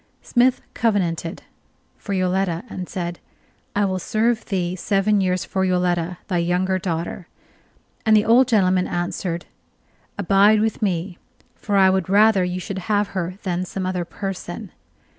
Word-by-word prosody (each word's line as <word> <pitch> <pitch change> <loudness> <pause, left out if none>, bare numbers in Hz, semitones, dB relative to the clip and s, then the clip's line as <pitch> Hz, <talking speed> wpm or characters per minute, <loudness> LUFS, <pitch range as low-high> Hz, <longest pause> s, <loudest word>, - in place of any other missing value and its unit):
Smith 250 +1 +2
covenanted! 175 -7 -1 0.5
for 200 - -6
Yoletta, 185 -1 0
and 180 -1 -6
said: 175 -2 -4 0.6
"I 205 0 +3
will 185 -1 -1
serve 220 +5 0
thee 180 -3 -1
seven 200 +2 +1
years 185 -1 0
for 190 - -1
Yoletta, 180 -1 0
thy 180 -4 0
younger 180 +2 +1
daughter"; 170 0 -4 0.8
and 220 -1 +5
the 210 - +2
old 240 +3 +5
gentleman 185 -6 +3
answered: 175 0 -3 0.7
"Abide 200 +2 +4
with 220 +1 -1
me, 180 -2 -2 0.4
for 205 - -3
I 190 -1 +6
would 190 -2 0
rather 205 -1 +5
you 180 0 -2
should 190 +1 -5
have 205 -1 +2
her 185 -1 -3
than 180 -1 -1
some 185 +1 -4
other 185 -1 -1
person." 195 +2 -6
185 Hz, 145 wpm, -22 LUFS, 180-205 Hz, 0.8 s, I